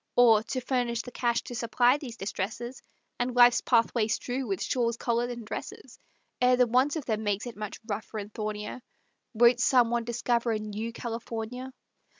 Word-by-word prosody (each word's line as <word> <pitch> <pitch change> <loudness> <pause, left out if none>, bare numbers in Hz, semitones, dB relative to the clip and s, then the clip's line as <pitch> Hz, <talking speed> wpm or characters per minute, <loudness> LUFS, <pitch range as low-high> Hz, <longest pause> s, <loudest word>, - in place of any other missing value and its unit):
Or, 230 -3 +6
to 255 +3 -4
furnish 240 -2 -1
the 250 - -9
cash 235 -1 0
to - - -8
supply 240 +2 +3
these 245 -6 -8
distresses, 220 +6 -4 0.4
And 245 0 -1
life's 245 0 +6
pathway 230 -2 +2
strew 245 +3 -2
with 195 -3 -2
shawls, 235 -2 0
collars 240 0 0
and 240 -2 -6
dresses, 210 - -8 0.4
Ere 250 0 +5
the 250 - +5
want 255 +5 +2
of 305 -5 -4
them 220 -2 -1
makes 205 +1 -1
it 240 - -7
much 210 -1 -6
rougher 215 0 -5
and 205 0 -6
thornier, 210 +2 -4 0.5
Won't 240 +2 +5
some 240 -1 +4
one 240 -1 +1
discover 235 0 0
a - - 0
new 215 +2 -5
California? 235 +2 -5
235 Hz, 175 wpm, -28 LUFS, 220-245 Hz, 0.5 s, Or